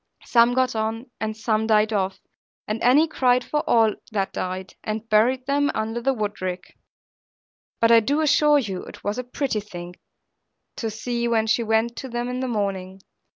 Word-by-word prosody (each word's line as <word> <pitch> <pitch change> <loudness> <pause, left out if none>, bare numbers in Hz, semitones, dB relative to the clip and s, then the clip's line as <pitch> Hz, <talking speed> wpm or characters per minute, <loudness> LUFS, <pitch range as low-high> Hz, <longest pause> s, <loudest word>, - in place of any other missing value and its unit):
Some 235 0 +4
got 255 -2 +1
on, 225 +3 -3
and 215 0 -3
some 220 0 0
died 215 0 +3
off; 190 -2 -1 0.5
and 215 +1 -3
Annie 280 +7 +5
cried 255 -5 +2
for 300 - -1
all 225 -2 +4 0.2
that 195 -3 -1
died, 185 +1 -4
and 215 +1 -4
buried 245 +4 +3
them 285 +1 +1
under 225 +2 -2
the 270 - +2
woodrick; 200 -6 -4 1.0
but, 230 0 +4
I 230 - +8
do 280 +7 0
assure 300 -1 +4
you, 200 -9 -2
it - - -12
was 205 +4 -2
a - - -2
pretty 250 -2 -2
thing 175 -4 -9 0.8
to 225 - -2
see, 235 +2 -2
when 225 -2 +2
she 220 +2 +2
went 225 +1 +1
to 265 - -6
them 240 +1 -3
in 250 0 -3
the 260 - -2
morning. 195 -4 -3
225 Hz, 180 wpm, -23 LUFS, 210-250 Hz, 1.0 s, I